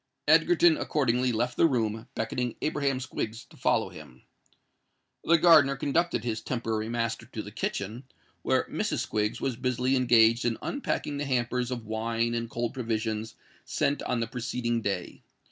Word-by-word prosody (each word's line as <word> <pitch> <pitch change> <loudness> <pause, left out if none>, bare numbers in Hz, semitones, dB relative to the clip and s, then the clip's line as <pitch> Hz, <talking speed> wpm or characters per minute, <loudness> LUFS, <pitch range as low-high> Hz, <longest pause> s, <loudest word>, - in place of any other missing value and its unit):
Egerton 345 -2 +5
accordingly 130 - +1
left 120 +2 -1
the 165 - +6
room, 110 -5 -1
beckoning 120 +2 -2
Abraham 140 -3 0
Squiggs 115 -3 -5
to - - -18
follow - - +1
him. - - -13 1.0
The 170 - +5
gardener 155 -5 +6
conducted 145 -1 0
his 110 -2 -2
temporary 110 -2 -2
master 115 0 -2
to 115 -4 -6
the 105 - -9
kitchen, 110 +3 -4 0.4
where - - +2
Mrs. - - -2
Squiggs 105 0 -1
was 130 -4 -2
busily 125 +1 0
engaged 120 -2 +4
in 120 -2 0
unpacking 150 - -2
the 145 - -2
hampers 125 -1 0
of 120 -3 -4
wine 115 +2 -1
and 115 -1 -2
cold 120 0 -3
provisions 110 -3 -3 0.3
sent 145 - 0
on 120 -2 -1
the - - +1
preceding 120 -1 -2
day. 95 -4 -3
120 Hz, 155 wpm, -28 LUFS, 115-130 Hz, 1.0 s, the